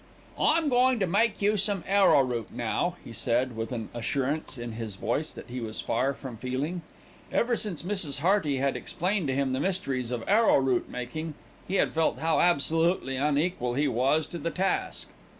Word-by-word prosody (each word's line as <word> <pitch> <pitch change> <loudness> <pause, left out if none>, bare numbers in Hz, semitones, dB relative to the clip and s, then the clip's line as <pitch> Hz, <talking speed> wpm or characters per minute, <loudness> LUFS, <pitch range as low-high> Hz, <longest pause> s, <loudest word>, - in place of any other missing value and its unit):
"I'm 320 0 +3
goin' 250 -1 +3
to 195 - +2
make 205 +4 +1
you 210 +1 +3
some 200 -2 0
arrowroot, 135 - +3
now," 120 +9 -1
he 115 - -9
said, 120 +2 0
with 115 +1 -4
an 115 -3 -4
assurance 135 +5 -2
in 120 0 -5
his 110 -3 -6
voice 120 +10 -1
that - - -10
he 125 +1 -4
was 110 -1 -5
far 135 +1 0
from 130 -4 -8
feeling. 135 +9 -3 0.5
Ever 235 0 +2
since 200 -9 -4
Mrs. 175 -8 0
Hearty 170 -5 +2
had 135 +1 0
explained 185 -1 -1
to 130 - 0
him 135 -1 0
the 130 - -1
mysteries 135 -10 -1
of 120 -2 -4
arrowroot 135 - +3
making, 150 +6 -5 0.3
he 190 - -2
had - - +2
felt 160 0 +1
how 160 0 +1
absolutely 165 -3 +2
unequal 145 -2 0
he 145 +2 +2
was 140 +6 +2
to 170 - -7
the 170 - -2
task. 190 +3 -1
145 Hz, 180 wpm, -28 LUFS, 125-185 Hz, 0.5 s, I'm